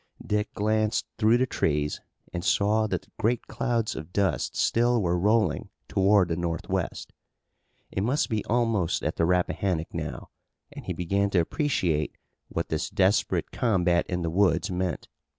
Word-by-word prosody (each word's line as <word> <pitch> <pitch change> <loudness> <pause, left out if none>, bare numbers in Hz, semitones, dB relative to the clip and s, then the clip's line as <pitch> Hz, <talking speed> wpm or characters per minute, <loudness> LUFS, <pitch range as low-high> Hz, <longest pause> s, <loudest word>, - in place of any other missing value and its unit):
Dick 105 +1 -1
glanced 110 +1 +1
through 110 +1 +5
the 130 - +2
trees 75 - -1 0.3
and 85 - -3
saw 105 +3 +2
that 95 0 -5
great 115 +2 0
clouds 115 -3 -1
of 80 +2 -7
dust 95 -9 0
still 120 +1 +2
were 90 -4 +1
rolling 105 +5 +1 0.2
toward 95 -1 +3
the 85 - 0
northwest. 85 -1 -3 0.8
It 95 - -2
must 130 +9 +1
be 110 -4 -1
almost 115 -7 +1
at - - -2
the 85 - +3
Rappahannock 90 -1 0
now, - - -5 0.4
and - - -10
he - - -2
began 100 +3 0
to 95 - +2
appreciate 85 - 0 0.3
what - - -3
this - - -1
desperate 95 +2 +1
combat 90 -7 +2
in 90 -1 -2
the 80 - -1
woods 90 -2 +2
meant. 90 -1 -2
100 Hz, 150 wpm, -27 LUFS, 85-110 Hz, 0.8 s, through